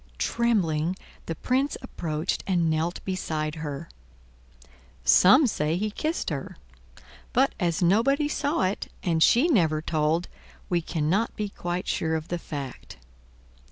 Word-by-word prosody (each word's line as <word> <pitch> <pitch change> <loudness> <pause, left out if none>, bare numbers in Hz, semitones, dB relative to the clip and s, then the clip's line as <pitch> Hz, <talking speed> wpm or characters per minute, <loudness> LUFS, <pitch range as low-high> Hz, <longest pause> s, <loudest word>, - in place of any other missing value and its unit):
Trembling, 180 - +1 0.3
the 165 - -3
Prince 260 - 0
approached 160 -8 -3
and 175 -4 +2
knelt 160 +3 -2
beside 155 -5 -2
her. 150 +1 -5 1.2
Some 230 +11 +7
say 160 - 0
he 210 +3 -1
kissed 315 - -2
her; - - -5 0.8
but 265 +2 +3
as 170 -1 0
nobody 260 - +3
saw 290 - 0
it, 185 +2 -2
and 165 -3 +1
she 245 - +5
never 165 - +3
told, 160 +2 0 0.4
we 175 -1 +1
cannot 165 +7 0
be 210 -1 -3
quite 175 -2 -4
sure 160 0 0
of 160 0 -4
the 175 - -2
fact. 140 - -7
175 Hz, 130 wpm, -26 LUFS, 160-220 Hz, 1.2 s, Some